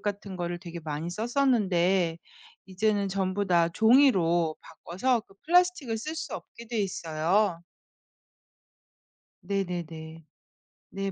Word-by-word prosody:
같은 200 Hz, -2 st, -4 dB
거를 175 Hz, 0 st, -3 dB
되게 170 Hz, -2 st, -8 dB
많이 155 Hz, +2 st, -4 dB
썼었는데 195 Hz, -7 st, +1 dB, 0.5 s
이제는 200 Hz, +1 st, 0 dB
전부 190 Hz, +1 st, -1 dB
다 170 Hz, -2 st, +3 dB
종이로 180 Hz, -, +4 dB
바꿔서 190 Hz, +10 st, -1 dB
그 195 Hz, -, -23 dB
플라스틱을 345 Hz, -9 st, +2 dB
쓸 310 Hz, +8 st, -5 dB
수 320 Hz, -, -5 dB
없게 235 Hz, -, -10 dB
돼 235 Hz, -, -2 dB
있어요. 170 Hz, 0 st, 0 dB, 1.8 s
네네네. 170 Hz, -4 st, -4 dB, 0.7 s
네, 195 Hz, 0 st, -3 dB
190 Hz, 225 characters per minute, -28 LUFS, 170-220 Hz, 1.8 s, 종이로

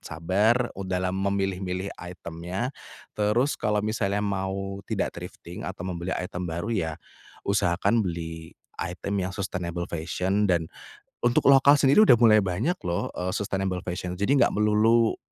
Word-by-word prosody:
sabar 105 Hz, +10 st, +1 dB
u 100 Hz, -, -6 dB
dalam 90 Hz, 0 st, -1 dB
memilih-milih 95 Hz, -1 st, -1 dB
item-nya 90 Hz, +6 st, -5 dB, 0.4 s
terus 110 Hz, +7 st, +2 dB
kalau 105 Hz, 0 st, +1 dB
misalnya 105 Hz, -2 st, 0 dB
mau 95 Hz, 0 st, -3 dB
tidak -, -, -1 dB
thrifting -, -, -9 dB
atau 90 Hz, -, -6 dB
membeli 90 Hz, 0 st, -3 dB
item 90 Hz, -1 st, -4 dB
baru 85 Hz, +8 st, -3 dB
ya 80 Hz, -7 st, -1 dB, 0.5 s
usahakan 100 Hz, +2 st, +2 dB
beli 80 Hz, -2 st, -5 dB, 0.3 s
item 95 Hz, +3 st, -3 dB
yang 90 Hz, -, -2 dB
sustainable 90 Hz, -3 st, -3 dB
fashion 90 Hz, +5 st, -1 dB
dan 85 Hz, -3 st, +2 dB, 0.6 s
untuk 120 Hz, +3 st, +4 dB
lokal 140 Hz, +1 st, +7 dB
sendiri 140 Hz, +9 st, +5 dB
udah 125 Hz, -, +8 dB
mulai 110 Hz, -2 st, +7 dB
banyak 105 Hz, -, -1 dB
loh 85 Hz, 0 st, -1 dB
e 90 Hz, +1 st, -3 dB
sustainable 95 Hz, -2 st, -2 dB
fashion. 90 Hz, 0 st, -4 dB
Jadi 100 Hz, +10 st, +2 dB
gak -, -, +4 dB
melulu 110 Hz, +2 st, +3 dB
95 Hz, 140 wpm, -26 LUFS, 90-105 Hz, 0.6 s, udah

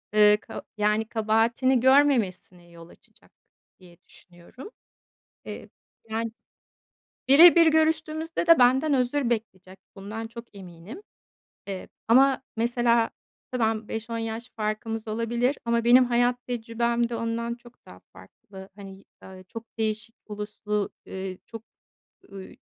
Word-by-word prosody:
ııı, 210 Hz, 0 st, +6 dB
ka -, -, -10 dB
yani, 210 Hz, +1 st, +1 dB
kabahatini 230 Hz, +4 st, +1 dB
görmemesine 230 Hz, -10 st, +2 dB
yol 170 Hz, 0 st, -14 dB
açacak, -, -, -23 dB, 0.5 s
diye 175 Hz, -2 st, -18 dB
düşünüyorum. 175 Hz, -, -15 dB, 0.8 s
Eee, -, -, -9 dB, 0.4 s
yani, 225 Hz, +1 st, -3 dB, 1.0 s
bire 320 Hz, +7 st, +8 dB
bir 335 Hz, -1 st, +6 dB
görüştüğümüzde 315 Hz, +1 st, 0 dB
de 335 Hz, -4 st, +7 dB
benden 265 Hz, +5 st, +4 dB
özür 255 Hz, 0 st, 0 dB
bekleyecek 190 Hz, -5 st, -5 dB, 0.2 s
bundan 215 Hz, +3 st, -7 dB
çok 235 Hz, -1 st, -12 dB
eminim. 190 Hz, -, -11 dB, 0.7 s
Eee, 195 Hz, -2 st, -6 dB, 0.2 s
ama 265 Hz, +3 st, +4 dB
mesela 235 Hz, 0 st, +2 dB, 0.4 s
ve -, -, -1 dB
ben, 220 Hz, -1 st, 0 dB
5-10 230 Hz, +1 st, -5 dB
yaş 225 Hz, +1 st, -5 dB
farkımız 220 Hz, +1 st, -4 dB
olabilir 235 Hz, +4 st, -1 dB
ama 235 Hz, 0 st, 0 dB
benim 250 Hz, +2 st, +6 dB
hayat 245 Hz, 0 st, +1 dB
tecrübem 235 Hz, 0 st, -1 dB
de 235 Hz, -, -4 dB
ondan 230 Hz, +1 st, -3 dB
çok 240 Hz, 0 st, -20 dB
daha 90 Hz, 0 st, -14 dB
farklı. 190 Hz, -, -14 dB
Hani, 195 Hz, -1 st, -12 dB, 0.2 s
eee, 185 Hz, 0 st, -12 dB
çok 230 Hz, +3 st, -8 dB
değişik 220 Hz, +1 st, -3 dB
uluslu, 210 Hz, 0 st, -4 dB, 0.2 s
eee, 190 Hz, -1 st, -6 dB
çok, 225 Hz, -2 st, -10 dB, 0.7 s
ııı, 195 Hz, -1 st, -9 dB
225 Hz, 125 wpm, -25 LUFS, 210-245 Hz, 1.0 s, bire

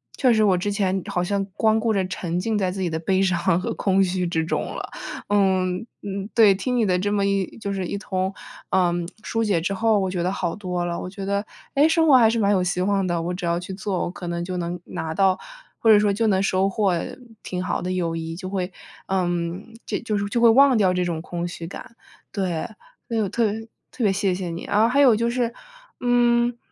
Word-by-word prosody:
确 250 Hz, -3 st, +3 dB
实 220 Hz, -, +3 dB
我 185 Hz, -3 st, +4 dB
之 205 Hz, +3 st, -1 dB
前 190 Hz, -2 st, 0 dB
好 180 Hz, -, -1 dB
像 195 Hz, +2 st, 0 dB
光 220 Hz, -1 st, +3 dB
顾 230 Hz, -, +1 dB
着 195 Hz, -3 st, +1 dB
沉 175 Hz, -1 st, -3 dB
浸 215 Hz, +3 st, -1 dB
在 185 Hz, -2 st, 0 dB
自 195 Hz, -, -6 dB
己 180 Hz, -, 0 dB
的 160 Hz, -, -2 dB
悲 190 Hz, +3 st, +1 dB
伤 180 Hz, -2 st, +2 dB
和 230 Hz, +4 st, -3 dB
空 195 Hz, -1 st, +2 dB
虚 185 Hz, -1 st, 0 dB
之 165 Hz, -2 st, -1 dB
中 -, -, -1 dB
了。 -, -, -6 dB, 0.4 s
嗯， 190 Hz, -1 st, +1 dB, 0.2 s
嗯 200 Hz, +1 st, -5 dB
对， 215 Hz, -5 st, +6 dB
听 250 Hz, +5 st, -1 dB
你 225 Hz, -, +3 dB
的 180 Hz, -2 st, +2 dB
这 205 Hz, +3 st, -1 dB
么 200 Hz, -1 st, +1 dB
一 195 Hz, 0 st, -1 dB
就 200 Hz, -3 st, -4 dB
是 190 Hz, -2 st, -2 dB
一 200 Hz, -, -3 dB
通， 190 Hz, -1 st, -2 dB, 0.4 s
呃， 180 Hz, -2 st, +2 dB, 0.3 s
疏 225 Hz, 0 st, -1 dB
解 200 Hz, -6 st, +2 dB
之 185 Hz, +4 st, -2 dB
后， 220 Hz, 0 st, +2 dB
我 190 Hz, -1 st, 0 dB
觉 180 Hz, -2 st, -2 dB
得 185 Hz, -, 0 dB
好 175 Hz, -3 st, -2 dB
多 180 Hz, -4 st, -3 dB
了， 170 Hz, 0 st, -2 dB
我 180 Hz, -, -5 dB
觉 195 Hz, 0 st, -7 dB
得， 200 Hz, +1 st, -1 dB, 0.3 s
诶， 290 Hz, +3 st, +4 dB
生 320 Hz, 0 st, +3 dB
活 280 Hz, -, +7 dB
还 230 Hz, -3 st, +6 dB
是 230 Hz, -, 0 dB
蛮 205 Hz, -1 st, +3 dB
有 185 Hz, -2 st, +2 dB
希 180 Hz, 0 st, -1 dB
望 195 Hz, 0 st, +1 dB
的， 170 Hz, -2 st, -1 dB
我 175 Hz, +2 st, -2 dB
只 180 Hz, -1 st, -4 dB
要 170 Hz, 0 st, +1 dB
去 185 Hz, +2 st, -7 dB
做， 195 Hz, -2 st, -3 dB
我 -, -, -3 dB
可 180 Hz, -1 st, -8 dB
能 170 Hz, 0 st, -3 dB
就 185 Hz, 0 st, -4 dB
能 175 Hz, 0 st, -3 dB
拿 160 Hz, 0 st, -4 dB
到， 190 Hz, +1 st, +3 dB, 0.4 s
或 225 Hz, -, +2 dB
者 210 Hz, -, +8 dB
说 205 Hz, -1 st, +2 dB
就 225 Hz, +3 st, +1 dB
能 190 Hz, -3 st, +3 dB
收 195 Hz, 0 st, +2 dB
获 195 Hz, -2 st, +1 dB, 0.5 s
挺 180 Hz, -1 st, -4 dB
好 185 Hz, -, -2 dB
的 180 Hz, -, -3 dB
友 170 Hz, -3 st, -1 dB
谊， 165 Hz, 0 st, -4 dB
就 185 Hz, 0 st, -6 dB
会， 185 Hz, -1 st, -2 dB, 0.4 s
嗯， 175 Hz, +3 st, -2 dB
就 -, -, -2 dB
就 215 Hz, -3 st, -2 dB
是 200 Hz, -, -1 dB
就 235 Hz, -, 0 dB
会 235 Hz, -1 st, +7 dB
忘 265 Hz, +1 st, +6 dB
掉 190 Hz, -4 st, +3 dB
这 180 Hz, -, 0 dB
种 170 Hz, -2 st, -2 dB
空 175 Hz, 0 st, -4 dB
虚 170 Hz, -1 st, -6 dB
感。 235 Hz, +5 st, -10 dB, 0.3 s
对， 180 Hz, -5 st, -2 dB, 0.4 s
所 230 Hz, -, -1 dB
以 -, -, +2 dB
我 210 Hz, -, +1 dB
特 230 Hz, +5 st, 0 dB
别 220 Hz, -, -4 dB, 0.3 s
特 240 Hz, -, -2 dB
别 195 Hz, -, +3 dB
谢 195 Hz, -1 st, +1 dB
谢 180 Hz, -1 st, -4 dB
你。 165 Hz, -, -6 dB
啊， -, -, -9 dB
然 -, -, +5 dB
后 -, -, +5 dB
还 275 Hz, +4 st, +3 dB
有 255 Hz, -5 st, +6 dB
就 235 Hz, +2 st, 0 dB
是， 240 Hz, -1 st, -1 dB, 0.5 s
嗯， 240 Hz, -1 st, +3 dB
195 Hz, 265 characters per minute, -23 LUFS, 180-215 Hz, 0.5 s, 者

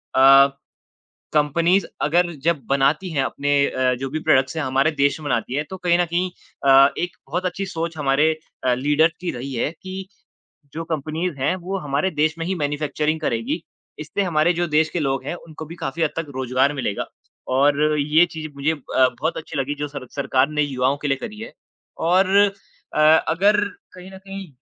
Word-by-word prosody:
अ, 135 Hz, +1 st, +8 dB, 0.9 s
companies 165 Hz, +5 st, +2 dB, 0.2 s
अगर 175 Hz, +3 st, +2 dB
जब 165 Hz, -1 st, +1 dB
बनाती 140 Hz, +6 st, +1 dB
हैं 145 Hz, -4 st, 0 dB
अपने 145 Hz, +2 st, -2 dB
अ, 130 Hz, -1 st, +1 dB
जो 135 Hz, +2 st, -4 dB
भी 155 Hz, -, -2 dB
प्रोडक्ट्स 140 Hz, -2 st, +2 dB
हैं, 160 Hz, -, -1 dB
हमारे 135 Hz, +4 st, +2 dB
देश 140 Hz, -1 st, +1 dB
में 150 Hz, -, -10 dB
बनाती 115 Hz, +1 st, -1 dB
हैं, 145 Hz, +2 st, 0 dB
तो 190 Hz, -, -5 dB
कहीं 175 Hz, -1 st, +2 dB
न 175 Hz, -, +3 dB
कहीं 175 Hz, +2 st, -1 dB, 0.4 s
अ, 135 Hz, +1 st, +8 dB
एक 175 Hz, -1 st, -3 dB
बहुत 180 Hz, +6 st, -2 dB
अच्छी 190 Hz, +2 st, -3 dB
सोच 165 Hz, -3 st, -4 dB
हमारे 145 Hz, +2 st, +3 dB, 0.3 s
अ, 125 Hz, -1 st, +3 dB
लीडर 150 Hz, +5 st, +2 dB
की 180 Hz, -, -2 dB
रही 130 Hz, +3 st, -6 dB
है 120 Hz, -, -1 dB
कि 190 Hz, 0 st, -6 dB, 0.7 s
जो 165 Hz, +1 st, -4 dB
कम्पनीज़ 160 Hz, +2 st, -3 dB
हैं 140 Hz, +7 st, +1 dB
वो 185 Hz, +2 st, -4 dB
हमारे 145 Hz, +2 st, -1 dB
देश 155 Hz, 0 st, +1 dB
में 165 Hz, -, -2 dB
ही 190 Hz, +2 st, -1 dB
मैन्युफैक्चरिंग 150 Hz, +1 st, -1 dB
करेगी, 115 Hz, -6 st, -1 dB, 0.4 s
इससे 155 Hz, +6 st, -3 dB
हमारे 170 Hz, -1 st, +2 dB
जो 175 Hz, +1 st, -1 dB
देश 155 Hz, 0 st, +2 dB
के 175 Hz, -, -3 dB
लोग 135 Hz, -2 st, -1 dB
हैं -, -, -3 dB
उनको 160 Hz, -2 st, -10 dB
भी 165 Hz, -, -9 dB
काफ़ी 165 Hz, +1 st, -3 dB
हद 155 Hz, -, +2 dB
तक 165 Hz, -, -2 dB
रोजगार 130 Hz, +2 st, +1 dB
मिलेगा 125 Hz, -8 st, -2 dB, 0.5 s
और 145 Hz, +1 st, +3 dB, 0.2 s
ये 155 Hz, +4 st, +4 dB
चीज़ 155 Hz, -1 st, -6 dB
मुझे 145 Hz, +3 st, 0 dB
ब 145 Hz, -4 st, -11 dB, 0.4 s
बहुत 160 Hz, +2 st, -1 dB
अच्छी 155 Hz, -1 st, -6 dB
लगी 140 Hz, +2 st, -2 dB
जो 145 Hz, 0 st, -3 dB
सर 140 Hz, -3 st, -8 dB
सरकार 140 Hz, -1 st, +1 dB
ने 150 Hz, 0 st, 0 dB
युवाओं 135 Hz, -1 st, 0 dB
के 145 Hz, -, -4 dB
लिए 135 Hz, -1 st, +1 dB
करी 215 Hz, -, -8 dB
है 225 Hz, -, -8 dB, 0.6 s
और 185 Hz, +1 st, +4 dB, 0.7 s
अ, -, -, +1 dB
अगर 165 Hz, +6 st, +4 dB, 0.3 s
कहीं 185 Hz, +1 st, -11 dB
न 190 Hz, -, -10 dB
कहीं 195 Hz, 0 st, -8 dB
155 Hz, 195 wpm, -22 LUFS, 140-175 Hz, 0.9 s, अ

